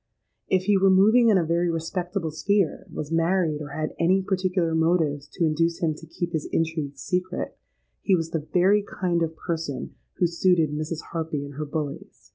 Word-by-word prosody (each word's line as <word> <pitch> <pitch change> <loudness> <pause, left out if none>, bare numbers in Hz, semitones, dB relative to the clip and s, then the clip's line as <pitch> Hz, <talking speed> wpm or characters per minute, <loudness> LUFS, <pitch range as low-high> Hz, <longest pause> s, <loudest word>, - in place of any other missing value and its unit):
If 185 -1 +2
he 200 0 +3
were 195 0 +5
moving 220 +5 +5
in 205 - +5
a 175 - +1
very 170 +2 +1
respectable 170 +1 -2
sphere, 195 +3 0
was 150 +1 -5
married, 165 -2 +1
or 150 - -5
had 155 +2 -3
any 185 +3 +3
particular 185 -3 0
motives 160 -3 +1
to 170 - +1
induce 165 +2 +1
him 160 -2 0
to 160 +2 -12
keep 170 +2 -4
his 155 -2 -2
intrigue 160 -4 -1
secret, 180 +4 -3 0.5
he 195 - +3
was 165 -2 -2
the 155 -2 -3
very 195 +3 +4
kind 180 -4 -1
of 165 -1 -1
person 160 -6 -4 0.2
who 180 - +1
suited 170 -2 +2
Mrs. 155 +2 -3
Harpy 160 -3 -3
and 140 - -9
her 150 +2 -4
bullies. 145 -1 -6
165 Hz, 185 wpm, -25 LUFS, 155-185 Hz, 0.5 s, were